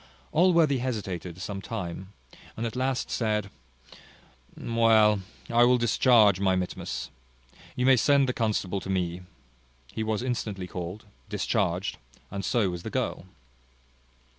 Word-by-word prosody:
Allworthy 165 -5 +4
hesitated 95 -8 -4
some 100 0 -5
time, 95 -3 -6 0.5
and 115 - -2
at 115 - -4
last 130 0 -1
said, 105 -3 -1 1.1
"Well, 110 -3 +3 0.3
I 120 +1 +4
will 125 +1 +5
discharge 115 -4 +4
my 95 -1 +2
mittimus. 90 -1 -4 0.6
You 125 - 0
may 130 -1 +6
send 140 +2 +4
the 125 - 0
constable 105 -5 -1
to 95 - -8
me." 90 -2 -1 0.7
He - - -3
was 110 +1 -1
instantly 110 -7 -3
called, 90 +3 -6 0.2
discharged, - - -1 0.3
and 100 0 -4
so 110 -7 +1
was 90 -1 -6
the - - -6
girl. 95 - -3
110 Hz, 130 wpm, -27 LUFS, 95-120 Hz, 1.1 s, may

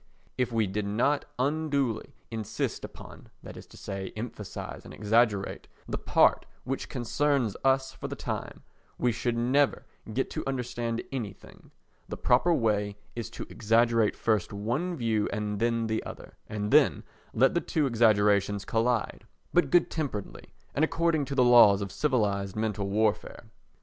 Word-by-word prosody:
If 125 -1 0
we 115 -2 +2
did 100 +2 -2
not 125 +8 +1
unduly 140 -4 -1 0.2
insist 110 -1 -3
upon—that - - -11
is - - -11
to - - -16
say, 95 -1 -5
emphasise 110 -3 -6
and - - -11
exaggerate—the 105 -2 0
part - - +3 0.2
which 135 +1 -4
concerns 130 -2 0
us 135 0 +2
for - - -7
the - - -5
time, - - -5 0.3
we 125 - +2
should 120 +1 -1
never 130 +4 +2 0.3
get 130 +5 -1
to - - -3
understand 120 -3 -2
anything; 120 -7 -7 0.4
the - - -5
proper 125 +8 +3
way 105 -7 +1 0.2
is 115 -2 -4
to - - -7
exaggerate 115 0 +2
first 110 -5 0
one 120 - -2
view 115 -6 0
and 105 0 -2
then 115 0 +1
the 110 0 -1
other, - - -10
and 105 -1 -3
then - - +4 0.3
let 130 +4 +3
the 170 - +1
two 155 -2 0
exaggerations 105 -4 +3
collide, 115 0 -1 0.3
but 175 - +3
good 175 -1 +3
temperedly 135 -11 -4 0.3
and 145 - +1
according 165 -2 +1
to 140 - -4
the 125 - +5
laws 120 -5 +7
of 100 -2 -4
civilised 100 -9 0
mental 105 -2 -2
warfare. 110 +1 -1
115 Hz, 150 wpm, -28 LUFS, 105-135 Hz, 0.4 s, laws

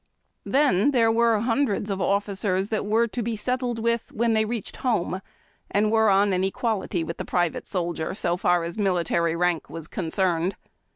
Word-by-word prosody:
Then, 275 -5 +3
there 235 -5 +3
were 230 -1 +3
liundreds 225 -3 0
of 195 -1 -2
officers 200 -1 0
that 215 -2 -2
were 225 +3 +3
to 240 - -3
be 230 0 -2
settled 250 +2 -2
with 235 0 -1
when 230 +1 +1
they 220 0 +2
reached 230 -1 -5
home, 200 -6 -1 0.5
and 210 +1 +1
were 220 -1 +4
on 200 0 +3
an 185 0 +1
equality 195 -3 -1
with 165 +1 -5
the - - -4
private 175 -2 -1
soldier 170 -2 -3
so 175 -4 0
far 175 -1 +2
as 170 +6 -5
military 170 -4 +1
rank 175 -1 0
was 165 -2 -8
concerned. 180 0 -1
200 Hz, 175 wpm, -25 LUFS, 180-225 Hz, 0.5 s, were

